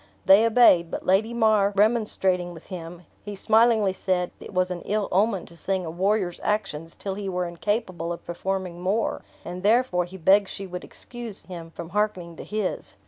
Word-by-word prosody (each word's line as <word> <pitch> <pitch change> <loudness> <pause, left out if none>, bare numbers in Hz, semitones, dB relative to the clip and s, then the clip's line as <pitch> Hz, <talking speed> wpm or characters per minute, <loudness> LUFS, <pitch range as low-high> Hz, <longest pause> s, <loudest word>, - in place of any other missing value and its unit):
They 200 +4 +7
obeyed; 215 -8 +5
but - - -5
Lady 200 +5 +3
mar 215 -3 +3
remonstrating 195 -5 +1
with 160 - -13
him, 170 0 -8 0.2
he 205 0 -6
smilingly 220 -1 +3
said, 180 -2 -1
it - - -10
was 185 -1 0
an 175 -1 -4
ill 210 0 -1
omen 200 0 +1
to 170 - -14
sing 190 +1 -2
a 160 - -4
warrior's 190 +1 0
actions 165 -6 -2
till 195 - -4
he 200 0 -4
were 180 -1 -1
incapable 175 -1 -2
of 170 - -7
performing 180 0 -4
more; 200 +5 0 0.2
and 180 +1 -6
therefore 210 -4 +2
he 185 +2 -10
begged 195 +3 +4
she 195 - -6
would 180 -1 -7
excuse 240 -4 -8
him 170 -3 -8
from 165 0 -8
hearkening 190 -4 -1
to - - -7
his. 210 -3 -3
190 Hz, 185 wpm, -25 LUFS, 175-210 Hz, 0.2 s, They